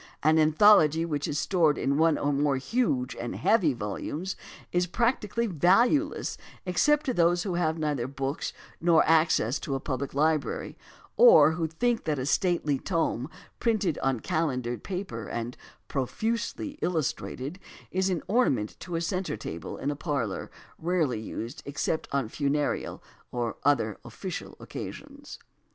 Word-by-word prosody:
An 155 +2 +5
anthology 160 0 +5
which 145 -3 -2
is 145 - -2
stored 160 -2 +2
in 140 +1 0
one 160 -1 +4
or 145 0 0
more 140 -1 +2
huge 135 - 0
and 120 - -5
heavy 190 -4 +3
volumes 130 - -4 0.4
is 180 0 +1
practically 235 +2 0
valueless 230 - +2 0.3
except 295 +12 +2
to 260 - 0
those 175 -2 +3
who 190 - -2
have 165 -2 0
neither 145 -6 -1
books 135 +2 -3 0.3
nor 165 -1 +5
access 155 -6 +3
to 135 - -3
a - - -1
pubUc 135 0 -4
library, 155 0 0 0.4
or 470 - +8
who 160 0 -1
think 235 +9 0
that 150 -2 0
a 130 - -2
stately 150 -3 +1
tome 165 -7 -1 0.3
printed 215 -9 +1
on 135 -4 0
calendered 125 -7 -1
paper 180 - -5
and 120 +1 -4 0.3
"profusely 230 - -2
illustrated" 155 -1 -2 0.3
is 190 +1 +1
an 180 -4 -1
ornament 140 - +1
to 175 -2 -5
a 165 - 0
centre 185 - -2
table 85 -5 -6
in 140 - -2
a - - -3
parlor 140 - -3 0.3
rarely 160 -9 0
used 115 +2 -6
except 145 +2 -2
on 140 -4 0
funereal 145 +4 -1 0.3
or 120 -2 -2
other 135 -7 +2
official - - -7
occasions. - - -8
155 Hz, 145 wpm, -28 LUFS, 135-185 Hz, 0.4 s, or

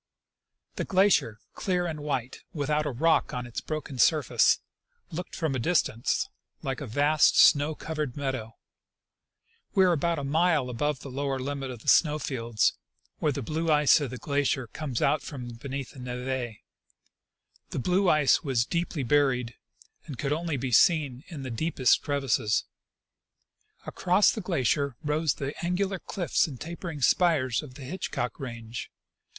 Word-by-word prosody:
The - - -1
glacier, 190 - +3 0.2
clear 180 -2 -1
and 160 -3 -4
white, 135 -4 -3 0.2
without 150 +1 0
a - - -1
rock 160 +4 +2
on 125 0 -3
its 120 - -5
broken 155 -4 -5
sur 155 +3 +4
face, - - +4 0.5
looked 175 +2 -6
from 160 -4 -1
a 130 - -1
little 165 - 0
distance 120 -9 +1 0.4
like 135 0 -3
a 140 - -5
vast 145 +6 +3
snow 145 +2 +6
covered 150 -6 -4
meadow. 130 -5 -3 1.2
We 190 - +6
were 180 - +4
about 170 +2 0
a 145 - -3
mile 155 -2 +2
above 145 +2 -1
the 140 - -8
lower 135 0 -2
limit 135 0 -4
of 120 -3 -8
the - - -17
snow 150 -3 +5
fields, 115 -6 0 0.5
where 150 - +1
the 140 -1 -4
blue 160 +6 -2
ice 150 0 +5
of 140 - -2
the 125 - -6
glacier 140 +1 0
comes 130 +1 -4
'Out 150 - +2
from 125 -5 -7
be 120 +4 -9
neath 135 -1 -4
the - - -13
neve. 125 -1 -4 1.1
The - - -5
blue 180 +7 +2
ice 150 -3 +4
was 130 -5 +1
deeply 170 -2 -2
buried, 125 -3 +2 0.5
and 140 - -7
could 140 +3 -1
only 165 -1 -2
be 130 0 -3
seen 140 -1 +3
in 155 -6 -7
the 130 - -5
deepest 130 +1 +2
crevasses. 135 -6 0 1.2
Across 185 +3 +3
the 220 - -4
glacier 140 - 0
rose 150 +1 +1
the 140 +1 -4
angular 190 +2 -1
cliffs 175 -2 0
and 135 -6 -8
tajjering 165 -3 -6
spires 145 -9 +3
of 135 -5 -12
the 140 - -9
Hitchcock 130 -5 -4
range. 115 -3 -6
145 Hz, 165 wpm, -27 LUFS, 125-160 Hz, 1.2 s, snow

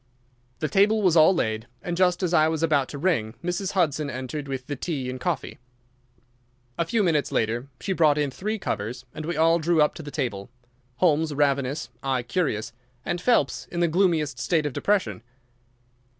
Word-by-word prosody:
The 155 - +1
table 205 +7 +3
was 180 -3 +4
all 160 +2 +7
laid, 110 -6 -1 0.2
and 175 - -2
just 180 0 +2
as 180 -1 0
I 155 -2 +5
was 160 0 -1
about 145 -5 +2
to 145 - -6
ring 140 -9 0
Mrs. 180 +2 -2
Hudson 155 -5 +1
entered 135 +3 -5
with 135 -2 -4
the 145 - -4
tea 135 -3 -3
and 130 - -6
coffee. 150 0 -3 1.2
A 170 - 0
few 215 +5 +1
minutes 155 -5 +1
later 120 +4 -1
she 195 - -2
brought 155 -4 +4
in 145 -2 0
three 215 +10 -3
covers, 120 - -4
and 155 - -6
we 175 - -2
all 165 +1 +4
drew 165 +1 +2
up 150 0 +4
to - - -8
the 145 - -8
table, 120 -10 -3 0.5
Holmes 155 -1 +2
ravenous, 140 +1 0
I 130 -2 -1
curious, 120 -5 -1 0.3
and 175 - -2
Phelps 240 +4 +1
in 170 - -4
the 175 - +3
gloomiest 160 -6 +1
state 160 +2 +1
of 145 - -2
depression. 200 - 0
155 Hz, 185 wpm, -25 LUFS, 130-175 Hz, 1.2 s, all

